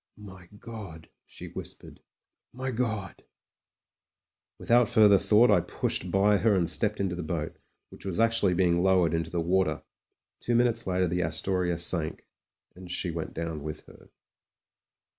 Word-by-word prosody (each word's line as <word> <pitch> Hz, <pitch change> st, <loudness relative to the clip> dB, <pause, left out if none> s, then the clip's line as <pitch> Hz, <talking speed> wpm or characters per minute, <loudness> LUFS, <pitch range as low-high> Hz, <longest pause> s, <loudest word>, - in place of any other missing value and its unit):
"My 95 Hz, -4 st, -13 dB
God 100 Hz, -9 st, -10 dB
!" -, -, -59 dB
she -, -, -10 dB
whispered. -, -, -8 dB, 0.5 s
"My 130 Hz, +1 st, -4 dB
God 110 Hz, -5 st, -3 dB, 0.6 s
!" -, -, -65 dB
Without 120 Hz, -1 st, +3 dB
further 105 Hz, -3 st, +5 dB
thought 110 Hz, +6 st, +4 dB
I -, -, +5 dB
pushed 90 Hz, -, -2 dB
by 100 Hz, +3 st, +3 dB
her 105 Hz, 0 st, +2 dB
and 90 Hz, -3 st, +1 dB
stepped 105 Hz, +3 st, 0 dB
into 95 Hz, -2 st, -1 dB
the 90 Hz, -, -4 dB
boat, 80 Hz, -2 st, -4 dB, 0.3 s
which -, -, -14 dB
was 95 Hz, -1 st, -4 dB
actually 115 Hz, -5 st, +2 dB
being 85 Hz, -1 st, +2 dB
low 95 Hz, -2 st, +3 dB
ered 80 Hz, -, -3 dB
into 80 Hz, 0 st, -2 dB
the 85 Hz, -, -3 dB
water. 95 Hz, +3 st, 0 dB, 0.6 s
Two 120 Hz, -, -1 dB
minutes 120 Hz, -2 st, +1 dB
later 90 Hz, 0 st, +1 dB
the 90 Hz, +2 st, -1 dB
Astoria 85 Hz, +2 st, 0 dB
sank, 85 Hz, -2 st, +1 dB, 0.5 s
and 90 Hz, 0 st, -12 dB
she 90 Hz, 0 st, -1 dB
went 80 Hz, -1 st, -6 dB
down 80 Hz, -2 st, -4 dB
with 75 Hz, +1 st, -7 dB
her. -, -, -18 dB
95 Hz, 160 wpm, -27 LUFS, 85-105 Hz, 0.6 s, further